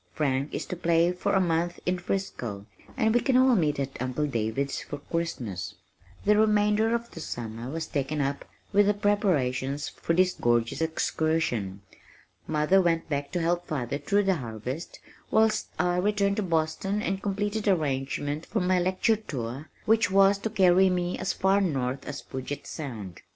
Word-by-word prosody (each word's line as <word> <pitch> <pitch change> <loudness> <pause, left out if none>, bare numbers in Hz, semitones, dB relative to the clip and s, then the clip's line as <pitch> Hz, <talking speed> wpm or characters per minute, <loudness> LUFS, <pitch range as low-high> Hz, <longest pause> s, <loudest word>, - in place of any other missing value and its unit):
Frank 140 -2 0
is - - -3
to - - -5
play 170 0 +3
for 180 +3 -1
a 195 - +4
month 175 -1 0
in 180 0 0
Frisco, 125 - -4 0.3
and 220 -3 +3
we 240 - +5
can 260 -2 +3
all 260 0 +5
meet 150 -7 +1
at 135 -2 -4
Uncle 130 +4 -1
David's 135 +1 -2
for 145 - -6
Christmas." 140 - -4 0.5
The 210 +1 +5
remainder 215 +1 +3
of 235 0 -4
the - - -9
summer 115 -4 -5
was 160 +2 -3
taken 145 +2 -2
up 140 0 -1 0.3
with 205 0 +5
the 205 - +3
preparations 145 -10 0
for 165 - -2
this 185 +1 +3
gorgeous 120 +3 +1
excursion. 155 -11 -1 0.6
Mother 155 +5 +3
went 165 -2 0
back 145 -1 -2
to 175 - 0
help 175 +1 0
father 140 -3 -2
through 200 +8 +2
the 190 -2 +2
harvest, 125 +5 -6 0.3
whilst 220 0 +3
I 180 0 +1
returned 200 +1 +1
to - - +1
Boston 180 +4 -1
and 195 +1 -1
completed 205 +2 -2
arrangements 145 -3 -1
for 220 - -1
my 180 0 +2
lecture 185 +5 +2
tour 135 - -6 0.2
which 220 -3 +3
was 195 +1 +5
to 220 - -2
carry 190 -2 +5
me 180 0 -1
as 185 0 0
far 195 +2 +2
north 135 -7 -1
as 145 - -5
Puget 130 +2 -6
Sound. 110 - -7
165 Hz, 170 wpm, -27 LUFS, 140-195 Hz, 0.6 s, we